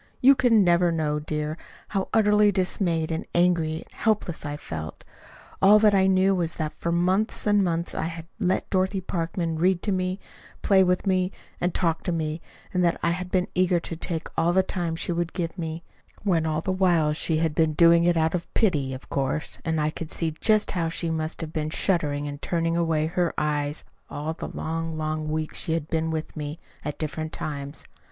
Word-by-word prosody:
You 270 +2 +7
can 240 -5 +4
never 175 -1 +4
know, 150 -2 0
dear, 150 +1 -3 0.3
how 195 -2 -1
utterly 210 -1 +4
dismayed 180 -4 0
and 160 - -2
angry 170 -3 +2
and - - -25
helpless 205 -8 -1
I 145 0 -4
felt. 80 - -7 0.6
All 200 +2 +8
that 210 -1 +5
I 190 -1 +4
knew 190 +1 +4
was 170 -3 -1
that 155 -1 -3
for 170 - -3
months 185 +5 +1
and 205 -1 +4
months 170 -1 -1
I - - -2
had 165 0 -6
let 185 -2 0
Dorothy 190 +1 +1
Parkman 165 -2 -2
read 180 +1 +2
to 210 - 0
me, 185 0 -1 0.4
play 190 -2 +5
with 180 +1 +1
me, 185 -1 +1 0.3
and 175 - 0
talk 165 -2 0
to 180 - 0
me 160 -1 -2 0.3
that 180 -2 +2
I 170 - +3
had 180 +1 -3
been 180 -1 +1
eager 180 -1 +3
to 165 - -6
take 165 0 -4
all 170 +1 +2
the 190 +1 +4
time 175 -3 -2
she 165 - -3
would 170 0 -2
give 170 -3 -3
me; 165 -2 -5 0.4
when 170 -6 +2
all 155 0 0
the 190 - -1
while 175 -5 +3
she 160 +1 0
had 160 -1 +1
been 160 0 +2
doing 170 +1 +6
it 175 0 +3
out 160 0 +2
of 175 -1 -3
pity, 145 - +1
of 130 - -11
course, 140 +2 -2
and 160 -1 0
I 150 0 +1
could 160 0 -7
see 165 -2 -1
just 215 -1 +3
how 170 -3 -1
she 165 0 -2
must 160 +1 -2
have 160 -1 -6
been 155 -1 -1
shuddering 150 -4 0
and 145 0 -7
turning 165 -1 0
away 165 -2 +1
her 170 +1 0
eyes 150 0 -1 0.3
all 150 +2 -3
the - - -6
long, 165 0 -3
long 155 0 -2
weeks 155 0 -2
she 160 - -1
had 160 -2 -2
been 160 0 0
with 160 -1 -4
me, 150 0 -5 0.3
at 150 - -4
different 155 0 -4
times. 140 -1 -5
165 Hz, 205 wpm, -25 LUFS, 155-185 Hz, 0.6 s, All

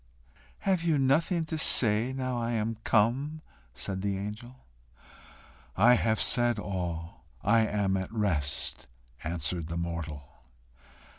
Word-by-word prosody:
"Have 190 -3 +1
you 165 -3 +2
nothing 160 +6 +2
to 160 0 -3
say 115 -2 +3
now 130 -2 -2
I 115 +1 -1
am 110 0 -2
come?" 135 +8 +1 0.3
said 95 +9 -3
the 100 -1 -1
angel. 105 +5 -7 1.2
"I 120 +6 +7
have 110 -2 +2
said 120 -2 +3
all. 90 -5 -5 0.2
I 110 +2 +4
am 100 -2 0
at 95 -1 -4
rest," 80 - -1 0.4
answered 85 0 -2
the 85 +1 -4
mortal. 85 -4 -4
105 Hz, 125 wpm, -29 LUFS, 90-125 Hz, 1.2 s, I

